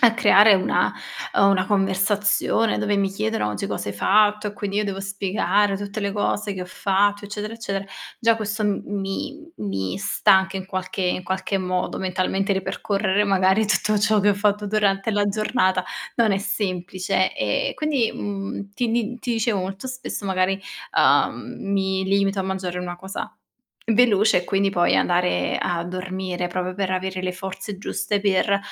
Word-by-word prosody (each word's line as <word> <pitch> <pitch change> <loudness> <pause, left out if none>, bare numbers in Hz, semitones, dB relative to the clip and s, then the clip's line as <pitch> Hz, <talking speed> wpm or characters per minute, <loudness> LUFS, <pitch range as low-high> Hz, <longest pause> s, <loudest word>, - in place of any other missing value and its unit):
a 235 -2 +6
creare 210 -3 +6
una, 185 - +1 0.4
ehm 195 - +5
una 185 -2 +2
conversazione, 205 +3 +1
dove 205 0 0
mi 195 -1 +2
chiedono: 215 - -1
"Oggi 105 - -3
cosa 100 0 -4
hai 100 - -4
fatto," 210 - +3
e 205 - -8
quindi 200 -1 -4
io 210 - +2
devo 195 -1 -3
spiegare 195 0 0
tutte 205 +1 -5
le 200 -1 -1
cose 205 0 -1
che 185 - -6
ho - - -8
fatto 205 +2 +1
eccetera, 210 +2 -5
eccetera; 200 -4 -4 0.4
già 230 -1 +4
questo, 215 0 -3
mhmm, 205 -1 0 0.2
mi 290 +12 -5
mi 95 -2 -3
stanca 190 -1 +3
in 190 - -8
qualche 185 0 -4
in 180 0 0
qualche 190 +2 -1
modo, 185 -1 -2
mentalmente 190 +1 0
ripercorrere 195 +1 0
magari 195 +2 +3
tutto 215 +1 +2
ciò 210 +1 +3
che 205 - +3
ho - - +2
fatto 205 +1 +1
durante 200 0 +1
la 205 -1 +1
giornata, 200 -2 +1 0.3
non 230 -3 +3
è 195 - +1
semplice. 185 -1 -1
Ehm, 105 -1 -1
quindi, 290 -7 0
mhmm, 200 0 -5
ti 240 -2 -1
di 235 +1 -1
ti 245 - -2
dicevo 225 -3 0
molto 190 +5 -5
spesso 255 -5 -5
magari, 190 +1 +1 0.4
uhm, - - +3
mi 190 -1 0
limito 195 0 +1
a - - -1
mangiare 185 -2 -3
una 175 -1 -5
cosa 195 +4 -6 0.6
veloce 215 -4 +4
e 175 - -5
quindi 195 +1 +1
poi 175 -2 +2
andare 90 - +1
a 170 -1 -1
dormire, 185 0 -4
proprio 180 +1 -3
per 195 -1 -2
avere 185 0 -2
le 185 - -1
forze 190 +1 -6
giuste 205 0 -2
per 200 0 +2
195 Hz, 170 wpm, -23 LUFS, 185-210 Hz, 0.6 s, a